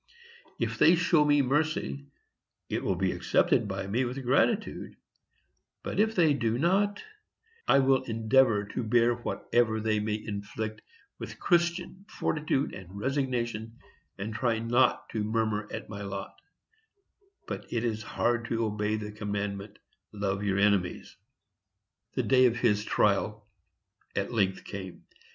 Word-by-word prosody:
If - - -2
they 170 - +7
show 170 -3 +3
me 145 -1 +4
mercy, 145 0 -1 0.6
it - - -2
will - - +1
be - - 0
accepted - - +2
by - - -3
me 110 +7 0
with 130 +2 -4
gratitude; 200 - +1 0.9
but - - -3
if 220 +1 +2
they 160 -5 +4
do 115 -4 0
not, 200 +7 +1 0.6
I - - +6
will 135 -1 +4
endeavor 115 -1 +3
to - - -3
bear 120 +2 +3
whatever 120 -1 0
they 110 -1 +1
may 105 0 -1
inflict 110 +1 -5 0.4
with - - -8
Christian 175 +2 0
fortitude 150 -2 -1
and 95 +1 -9
resignation, 120 -3 -2 0.4
and 105 +3 -4
try 115 0 0
not 120 +3 +2
to 110 -2 -2
murmur 110 -1 -1
at - - -6
my 100 -1 -7
lot; 100 0 -5 1.1
but - - -7
it 115 -1 -1
is 110 -2 -1
hard 120 +1 0
to 115 -1 -1
obey 105 0 -1
the 105 -1 -5
commandment, 105 -1 -4 0.3
"Love 100 -1 -2
your 100 -2 0
enemies." 100 -3 +1 1.0
The - - +1
day 130 -1 +5
of 120 -1 -1
his 105 -3 +2
trial 105 0 +1 0.7
at 100 +4 -2
length 95 -4 +1
came. 95 -3 -8
115 Hz, 140 wpm, -29 LUFS, 105-135 Hz, 1.1 s, they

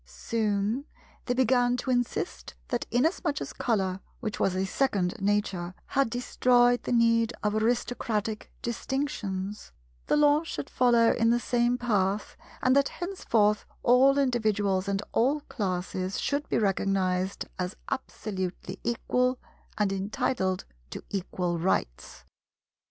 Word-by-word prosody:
Soon, 210 - -1 0.4
they 245 - 0
began 245 -1 +3
to 260 +1 -2
insist 225 - -2
that - - -2
inasmuch 300 +4 +1
as - - -6
Colour, 190 -5 0 0.2
which 215 -4 -4
was 185 - +1
a 190 +1 0
second 190 -5 0
Nature, 195 -3 0
had 275 -3 +1
destroyed 245 0 +3
the - - -4
need 230 -1 +3
of 210 0 +1
aristocratic 220 -1 -1
distinctions, 215 -6 -3 0.4
the - - +3
Law 295 0 +5
should 330 - -6
follow 235 -2 +4
in 230 0 +2
the 240 +1 +3
same 240 0 +1
path, 205 -4 0 0.3
and 255 +1 +4
that 280 0 +4
henceforth 225 - +1 0.2
all 265 +3 +5
individuals 215 -7 +1
and 200 0 -1
all 275 +6 +2
classes 185 -4 -3
should 285 +1 -1
be - - +1
recognized 195 -2 0
as 180 +1 -2 0.2
absolutely 190 -7 -4
equal 250 +2 +1 0.4
and 205 -2 +1
entitled 190 -1 -1 0.2
to - - -7
equal 180 -3 -2
rights. 160 - -2
220 Hz, 125 wpm, -28 LUFS, 195-245 Hz, 0.4 s, Law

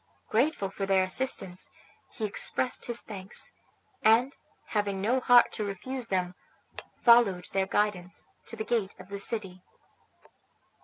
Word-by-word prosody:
Grateful 230 -4 +1
for 195 0 -4
their 190 -1 +4
assistance, 185 -3 -2 0.4
he 220 - -4
expressed 245 +4 0
his 240 -1 -1
thanks, 195 -2 -2 0.5
and, 235 +5 +4 0.3
having 205 -2 -1
no 235 +7 +1
heart 245 -1 +6
to 215 - -3
refuse 230 +6 -4
them, 180 -3 -1 0.6
followed 230 -7 +5
their 195 -1 +1
guidance 195 -3 -1 0.2
to 230 - -5
the 220 - -4
gate 220 -5 -1
of 185 +1 -12
the 200 0 -5
city. 195 -4 -3
205 Hz, 135 wpm, -28 LUFS, 190-235 Hz, 0.6 s, heart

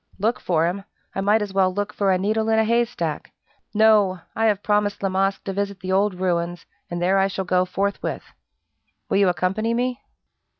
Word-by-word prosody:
"Look 225 +5 0
for 165 -2 +1
him? 185 +3 -2 0.3
I 195 - -2
might 210 +2 +3
as 200 -2 -6
well 190 -1 +3
look 205 +2 -3
for 200 -2 +1
a 185 - +3
needle 220 +4 0
in 220 - +3
a 220 - +4
haystack. 230 -9 -1 0.4
No! 210 -4 +4 0.2
I 225 - +1
have 205 -2 +1
promised 205 -1 0
La 195 - +1
Masque 195 +1 0
to 195 - -4
visit 200 0 -3
the 185 -1 -4
old 195 0 +2
ruins, 175 -1 -2 0.2
and 175 - -3
there 185 +3 +2
I 195 - +3
shall 190 0 -4
go 180 0 +2
forthwith. 200 +2 -2 0.9
Will - - +2
you 200 -2 +4
accompany 195 +6 0
me?" 250 +2 -1
195 Hz, 200 wpm, -23 LUFS, 185-215 Hz, 0.9 s, a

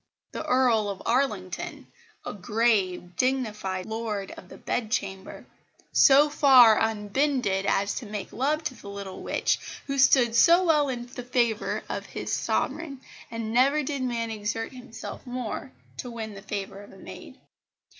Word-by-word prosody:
The - - -5
Earl 240 -5 +2
of 195 -2 -6
Arlington, 220 -7 -1 0.4
a - - -4
grave, 195 -4 0
dignified 215 -8 -1
Lord 220 -3 -4
of 180 - -12
the - - -11
Bedchamber, 200 -5 -3 0.5
so 280 +2 +6
far 260 -7 +7
unbended 215 -1 0
as 200 +1 +1
to 245 - -10
make 205 -2 -6
love 295 +6 0
to - - -3
the 200 - -11
little 200 -2 -7
witch, - - 0 0.3
who 275 -1 -2
stood 255 -4 +5
so 340 +8 +6
well 300 -4 +3
in 240 -2 -4
the 250 +1 -8
favour 240 -3 0
of - - -5
his - - -5
Sovereign; 285 -5 -2 0.3
and 230 -1 -4
never 275 +5 +3
did 280 -1 -3
man 235 -3 -2
exert 215 +1 -3
himself 245 -3 -9
more 245 - -5 0.3
to 245 - -5
win 220 -2 -6
the 195 - -10
favour 200 -1 -5
of 205 - -14
a - - -15
maid. - - -11
230 Hz, 155 wpm, -26 LUFS, 205-260 Hz, 0.5 s, far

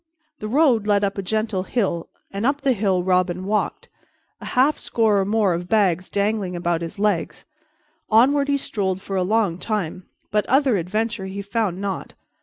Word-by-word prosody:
The 215 - -5
road 245 -4 +3
led 205 -1 +3
up 200 0 -1
a - - 0
gentle 215 0 -1
hill 190 -5 -2 0.2
and 200 +2 -4
up 280 +3 +1
the 270 -2 +2
hill 190 -4 0
Robin 185 0 +1
walked, 210 +1 -1 0.5
a - - -8
half 275 +4 +4
score 220 -3 +2
or 195 - +1
more 205 -2 +2
of 175 +1 -4
bags 185 -5 +2
dangling 200 -2 -1
about 175 -1 -1
his 170 +4 -6
legs. 205 -4 -1 0.6
Onward 280 +6 +4
he 285 0 +2
strolled 190 -8 -2
for 195 0 -6
a 185 - +1
long 195 -2 +1
time, 185 -5 -3 0.2
but 210 0 +2
other 265 -4 +3
adventure 210 +3 -2
he 200 +1 -5
found 200 -3 -1
not. 200 -1 -4
200 Hz, 180 wpm, -22 LUFS, 185-225 Hz, 0.6 s, half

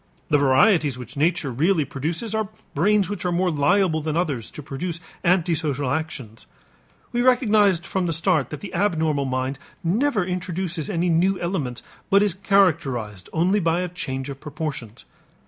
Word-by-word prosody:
The 150 -2 +4
varieties 145 - +4
which 125 -2 -10
nature 150 -2 +1
really 155 +5 +2
produces 165 - -3
are 220 -2 -1 0.2
brains 200 +5 +3
which 205 -2 -5
are 180 - 0
more 180 +1 +1
liable 160 +2 +2
than 155 +1 -2
others 145 -10 -1
to 150 - -9
produce 165 +5 -4 0.2
antisocial 160 -6 +1
actions. 135 -8 -4 0.6
We 240 - 0
recognized 210 - +3
from 185 -2 -1
the - - 0
start 160 - +1
that 150 - -7
the 195 -3 -8
abnormal 160 -7 +1
mind 130 +1 -2 0.2
never 205 +3 +1
introduces 180 -2 -3
any 175 -2 0
new 180 +3 +2
elements 160 -9 -3 0.3
but 200 +1 +5
is 205 -4 +1
characterized 160 - +1
only 180 +6 +2
by 170 -1 +1
a 180 - -2
change 135 -6 -4
of 135 - -9
proportions. 140 -7 -6
165 Hz, 160 wpm, -23 LUFS, 140-190 Hz, 0.6 s, but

